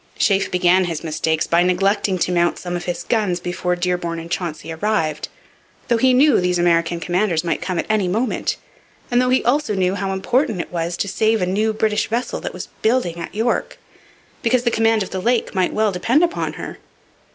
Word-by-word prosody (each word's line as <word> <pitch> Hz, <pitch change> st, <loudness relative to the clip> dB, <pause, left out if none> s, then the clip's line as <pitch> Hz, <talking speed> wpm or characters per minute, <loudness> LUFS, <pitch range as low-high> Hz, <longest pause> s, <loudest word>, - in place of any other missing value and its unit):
Sheaffe 195 Hz, -1 st, +2 dB
began 180 Hz, +1 st, +3 dB
his 165 Hz, -2 st, -4 dB
mistakes 160 Hz, 0 st, 0 dB
by 170 Hz, +1 st, +3 dB
neglecting 190 Hz, +2 st, +1 dB
to 180 Hz, -, 0 dB
mount 175 Hz, -1 st, +2 dB
some 175 Hz, -1 st, -5 dB
of 175 Hz, -, -4 dB
his 175 Hz, -1 st, -3 dB
guns 205 Hz, -6 st, 0 dB
before 180 Hz, 0 st, -2 dB
Dearborn 175 Hz, -1 st, -2 dB
and 165 Hz, +1 st, -8 dB
Chauncey 165 Hz, -3 st, -4 dB
arrived, 160 Hz, -4 st, -1 dB, 0.6 s
though 235 Hz, -, +3 dB
he 260 Hz, +2 st, +4 dB
knew 270 Hz, -2 st, +4 dB
these 180 Hz, 0 st, +1 dB
American 170 Hz, -1 st, +2 dB
commanders 175 Hz, 0 st, 0 dB
might 170 Hz, -, -1 dB
come 185 Hz, -2 st, -3 dB
at -, -, -1 dB
any 215 Hz, -3 st, +1 dB
moment, 225 Hz, +8 st, -1 dB, 0.5 s
and 245 Hz, +1 st, +4 dB
though 250 Hz, -, +1 dB
he 255 Hz, -, +2 dB
also 255 Hz, -2 st, +1 dB
knew 185 Hz, -1 st, +1 dB
how 195 Hz, 0 st, -2 dB
important 220 Hz, +2 st, 0 dB
it -, -, -5 dB
was 170 Hz, 0 st, -2 dB
to -, -, -1 dB
save 220 Hz, +3 st, +1 dB
a 180 Hz, -, +1 dB
new 210 Hz, +4 st, +1 dB
British 215 Hz, -1 st, 0 dB
vessel 235 Hz, +3 st, -2 dB
that -, -, -5 dB
was -, -, -8 dB
building 220 Hz, -7 st, +1 dB
at 170 Hz, -, -7 dB
York, 230 Hz, +3 st, -1 dB, 0.6 s
because 240 Hz, +1 st, +2 dB
the 235 Hz, -, +1 dB
command 225 Hz, -1 st, +2 dB
of -, -, -9 dB
the 190 Hz, -, -3 dB
lake 240 Hz, +3 st, 0 dB
might 185 Hz, -2 st, +1 dB
well 215 Hz, -1 st, +1 dB
depend 235 Hz, -, +2 dB
upon 345 Hz, +1 st, -1 dB
her. -, -, -8 dB
185 Hz, 205 wpm, -20 LUFS, 175-220 Hz, 0.6 s, he